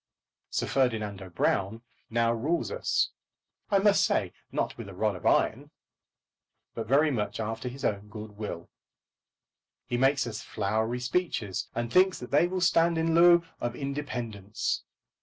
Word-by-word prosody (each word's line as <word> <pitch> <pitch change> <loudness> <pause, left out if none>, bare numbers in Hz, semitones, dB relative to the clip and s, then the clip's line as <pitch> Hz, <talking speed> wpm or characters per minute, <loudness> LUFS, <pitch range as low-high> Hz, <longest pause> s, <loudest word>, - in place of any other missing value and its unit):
Sir - - -1
Ferdinando 105 -7 -1
Brown 100 +5 0 0.3
now 115 0 +2
rules 150 +9 -1
us, - - +1 0.6
I 200 - +4
must 200 +1 +4
say, - - +1 0.2
not - - -1
with - - -8
a - - -10
rod - - 0
of - - -3
iron, - - +2 1.0
but 115 -2 -5
very 145 +5 +4
much 105 -4 -2
after 115 +3 -3
his 135 +3 -6
own 100 0 -1
good 105 +1 -8
will. 105 -5 -7 1.1
He 120 - -2
makes 135 +1 +3
us 110 -3 -5
flowery 110 +4 -1
speeches, 125 - -1
and 120 0 -3
thinks 185 0 +5
that 125 - -9
they 150 +5 +4
will 185 0 -2
stand 170 -2 +3
in 165 0 +1
lieu 170 0 +7 0.2
of 120 0 -3
independence. 120 -8 -3
120 Hz, 150 wpm, -28 LUFS, 110-160 Hz, 1.1 s, lieu